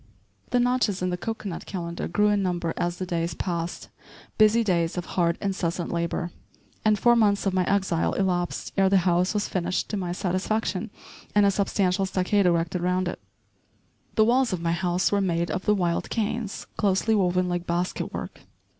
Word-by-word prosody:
* - - -37
The 245 - +2
notches 245 -6 +1
in 180 - 0
the - - 0
cocoanut 205 -1 -5
calendar 170 -2 -4
grew 210 +5 +2
in 205 -1 +2
number 175 -3 -1
as 175 0 -2
the 185 - -3
days 170 -2 -2
passed, 170 -2 -4 0.5
busy 215 +2 +5
days 170 -4 0
of 175 - -2
hard, 170 -2 +2
incessant 180 -4 -2
labor, 170 +1 -2 0.5
and 215 -1 +3
four 240 +4 +4
months 205 -3 +3
of 195 - +1
my 185 -1 +2
exile 190 -4 +1
elapsed 180 -2 -1
ere 195 -1 +4
the 195 - +5
house 180 +2 +2
was 210 - 0
finished 185 0 -2
to 210 - -1
my 180 -2 -3
satisfaction 185 +3 -1 0.5
and 205 -1 +6
a 200 - +4
substantial 195 -1 +1
stockade 190 +1 +2
erected 170 0 +1
around 180 +1 +1
it. 175 - -4 1.0
The 220 - +5
walls 245 +1 +3
of 185 - -1
my 165 0 -1
house 175 +1 +1
were 200 -1 +2
made 170 -2 0
of 185 - -3
the 210 - +4
wild 175 -3 -1
canes 220 -1 -2
closely 205 +2 +2
woven 180 -3 +2
like 175 -1 -2
basket 175 +1 -2
work. - - -7
185 Hz, 185 wpm, -25 LUFS, 175-205 Hz, 1.0 s, and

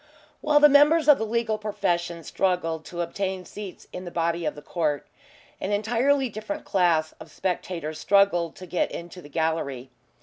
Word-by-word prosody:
While 300 -1 +4
the 295 - +9
members 295 +2 +5
of 295 -2 +7
the 220 - -2
legal 220 -1 0
profession 175 -5 -2
struggled 165 -3 -1
to 175 -1 -5
obtain 185 +2 -3
seats 205 -1 -9
in 180 - -6
the 175 - -6
body 170 0 -1
of 150 - -1
the 150 - -10
court, 150 -3 -1 0.5
an 195 - -3
entirely 240 +6 +2
different 225 +8 -6
class 170 -5 +2
of - - -11
spectators 165 -2 -3
struggled 195 -5 +3
to 185 - -10
get 175 0 0
into 175 +1 -8
the 145 - -13
gallery. 140 -5 -2
180 Hz, 170 wpm, -25 LUFS, 165-215 Hz, 0.5 s, the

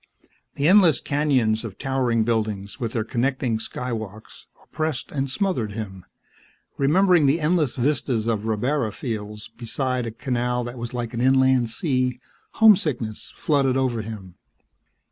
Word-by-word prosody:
The 140 - +1
endless 180 -7 +6
canyons 130 -7 +1
of 110 -5 -7
towering 125 -4 0
buildings, 110 -2 -2
with 115 -3 -3
their 115 - 0
connecting 120 0 -1
Skywalks, 110 -3 -6 0.2
oppressed 155 -4 -3
and 135 -1 -2
smothered 130 - -1
him. 95 -4 -7 0.7
Remembering 170 +2 +4
the 145 +5 +3
endless 155 -5 +1
vistas 125 -4 0
of 110 -2 -1
rabbara 115 +1 0
fields 105 -3 -5
beside 125 +1 -2
a - - -4
canal 125 0 -1
that 120 +1 -7
was 120 +1 -5
like 120 -1 -4
an 120 - -2
inland 130 -2 +4
sea, 130 - -1 0.3
homesickness 150 - +3
flooded 135 -4 +1
over 125 -4 0
him. 105 -4 -8
125 Hz, 135 wpm, -23 LUFS, 110-140 Hz, 0.7 s, endless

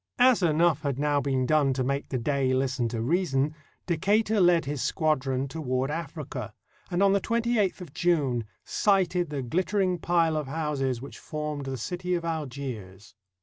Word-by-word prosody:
As 250 -3 +5
enough 165 -2 +3
had 140 -4 -2
now 145 0 +1
been 135 -2 0
done 145 -2 +3
to 130 0 -1
make 140 +2 -2
the 130 - -1
Dey 135 +2 0
hsten 130 -2 0
to 115 -1 -3
reason, 150 -1 +1 0.3
Decatur 205 +5 +2
led 175 -3 +4
his 145 -1 -3
squadron 135 -4 0
toward 135 -2 -2
Africa, 155 -2 -5 0.3
and 175 +3 +1
on 195 0 +5
the 200 - +2
28th 230 -4 0
of 165 -6 -9
June 145 -10 +1 0.2
sighted 180 -4 +2
the 140 -3 -3
gUttering 185 - 0
pile 165 -2 +2
of 150 -3 -3
houses 135 -4 -2
which 140 - -9
formed 150 -2 -4
the 135 -1 -3
city 180 +8 -2
of 170 -1 -3
Algiers. 125 - -5
150 Hz, 165 wpm, -27 LUFS, 135-175 Hz, 0.3 s, As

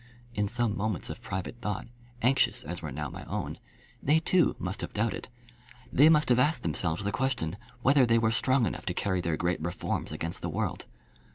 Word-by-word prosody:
In 105 -2 0
some 115 0 0
moments 105 -1 -2
of - - -8
private 110 +1 -5
thought, 105 -4 -2 0.4
anxious 130 +3 +3
as - - -5
were - - -5
now 75 +2 -3
my - - -8
own, - - -4 0.4
they 150 +3 +4
too 175 +1 +3
must 90 +2 -3
have - - -5
doubted. 110 +2 -1 0.7
They 145 +4 +7
must 150 -3 +4
have 125 0 +5
asked 150 +6 +2
themselves 80 +2 -1
the 100 - 0
question, 125 -10 -1 0.3
whether 135 -1 +5
they 115 0 +4
were 110 -1 +3
strong 130 +1 +3
enough - - -4
to 90 - -1
carry 95 -2 0
their 85 -2 -1
great 90 -1 0
reforms 85 +2 -2
against 85 0 -4
the - - -2
world. - - -2
110 Hz, 195 wpm, -29 LUFS, 90-130 Hz, 0.7 s, They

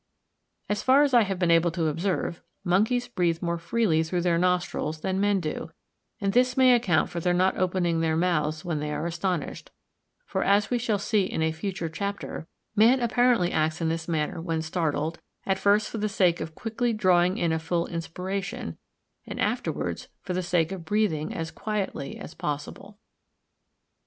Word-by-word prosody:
As 205 0 -1
far 270 +3 +5
as 285 -2 +1
I 240 - +7
have 195 -3 -1
been 175 -2 +2
able 165 +1 +4
to 170 -2 -1
observe, 170 +2 -1 0.2
monkeys 215 +7 +2
breathe 175 -7 0
more 170 0 -1
freely 170 -3 +1
through 175 +2 -1
their 170 -1 +2
nostrils 175 -3 0
than 190 0 -1
men 205 -1 +3
do; 160 -1 -4 0.5
and 195 -2 0
this 250 +1 +3
may 255 -1 +7
account 210 -10 +2
for 170 - -3
their 175 +1 +1
not 185 +1 +3
opening 175 -2 +1
their 160 -1 +1
mouths 155 -3 0
when 165 -4 -1
they 150 0 -3
are 150 +2 -2
astonished; 170 -2 -3 0.6
for, - - -1
as 200 +2 +3
we 245 - +2
shall 225 -3 0
see 200 0 +1
in 160 - -2
a 160 - +2
future 175 +1 -4
chapter, 200 -1 -5 0.3
man 230 +5 +5
apparently 240 -6 +3
acts 155 +1 0
in 165 -2 0
this 165 0 -3
manner 160 -1 -1
when 165 -2 -2
startled, 160 -1 -1 0.3
at 190 0 0
first 205 +2 +3
for 225 - -5
the 215 +1 0
sake 180 -4 +2
of 160 0 -6
quickly 235 +1 -1
drawing 185 -3 +3
a 160 -1 +1
full 170 +1 -1
inspiration, 180 +3 -4 0.5
and - - -6
afterwards - - -2 0.2
for 185 - -3
the 185 - 0
sake 175 -1 +1
of 190 -3 -5
breathing 165 -5 0
as 165 0 -4
quietly 210 -9 -3
as 160 - -9
possible. 150 +7 -5
180 Hz, 180 wpm, -26 LUFS, 165-205 Hz, 0.6 s, I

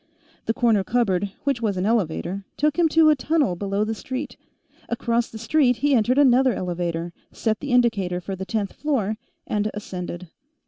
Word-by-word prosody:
The 225 - +2
corner 225 -5 +3
cupboard, 200 -4 0
which 275 -4 0
was 205 -4 0
an 180 - 0
elevator, 200 -3 -1
took 300 +3 +1
him 330 -2 +4
to 315 0 +5
a - - +4
tunnel 285 - +1
below 200 +2 -1
the 220 +1 -2
street. 260 +6 -5 0.5
Across 235 0 0
the 225 - -9
street, 250 +3 +2
he 285 +3 +2
entered 245 +2 +3
another 260 -2 +5
elevator, 175 -2 -3 0.2
set 220 -2 -1
the 285 - -5
indicator 215 -8 +2
for 190 +2 -5
the 190 - -6
tenth 205 -1 -2
floor, 225 -9 -1 0.3
and 210 0 -1
ascended. 180 -3 -6
220 Hz, 175 wpm, -23 LUFS, 190-255 Hz, 0.5 s, to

